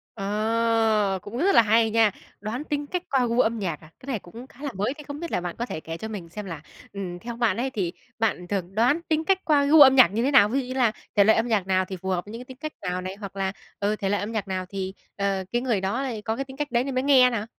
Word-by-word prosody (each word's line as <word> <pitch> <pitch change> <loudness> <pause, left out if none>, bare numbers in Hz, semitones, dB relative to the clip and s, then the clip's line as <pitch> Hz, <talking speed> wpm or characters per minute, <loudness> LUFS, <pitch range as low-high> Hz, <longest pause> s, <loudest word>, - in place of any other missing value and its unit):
Ờ. 215 -1 +1
Cũng 220 +4 -7
rất 390 +7 +3
là - - +9
hay 225 +1 +3
nha! 225 -1 +4 0.3
Đoán 220 +6 -4
tính 290 -1 -3
cách 360 +2 -3
qua 260 -2 +2
gu 235 +2 0
âm 230 -1 +2
nhạc 175 -7 -3
à? 155 - -15
Cái 255 - -15
này 245 -7 -2
cũng 230 +10 -12
khá 270 +2 -15
là 285 - -1
mới. 205 +7 -1
Thế 300 0 -12
không 285 +1 -6
biết 340 -1 -5
là - - 0
bạn 175 -1 -5
có 240 - -2
thể 160 - -5
kể 165 +1 -7
cho 220 - -6
mình 200 -6 -7
xem 210 +4 -7
là, 165 -5 -7 0.3
ừm, 180 -3 -5
theo 235 +2 -6
bạn 225 -5 +1
ấy 260 +3 -1
thì 190 -8 -2 0.3
bạn 205 -5 0
thường 190 -1 -3
đoán 250 +9 +3
tính 315 0 +1
cách 385 +1 +3
qua 295 -3 +4
gu 300 +2 +7
âm 265 -1 +9
nhạc 255 - +8
như 230 - 0
thế 275 - +2
nào? 210 -6 +6
Ví 270 +4 +1
dụ 260 - -3
như 255 - -4
là 245 -4 +3 0.2
thể 205 - +6
loại 220 +2 +5
âm 225 - +1
nhạc 205 -5 0
nào 185 0 +2
thì 190 0 -6
phù 190 +2 -5
hợp 180 -1 -1
với 210 - -10
những 230 - -7
cái 250 - -9
tính 260 -1 -12
cách 305 +2 -6
nào 180 -1 -2
này? 185 +1 -5
Hoặc 200 -1 -9
là, 195 -1 -1 0.3
ừ, 205 +1 +1
thể 195 - -1
loại 205 - +1
âm 210 +3 -4
nhạc 215 -3 -3
nào 185 -1 -3
thì, 190 -1 -4 0.2
ờ, 200 -1 -1
cái 240 - 0
người 235 -7 0
đó 200 +7 -1
lại 245 -6 -3
có 220 +2 -2
cái 275 +3 -3
tính 265 0 -12
cách 295 -2 -3
đấy 240 0 +2
nên 270 -1 -4
mới 255 - +1
nghe 265 -3 +6
nè? 220 -3 -2
225 Hz, 310 wpm, -25 LUFS, 195-260 Hz, 0.3 s, là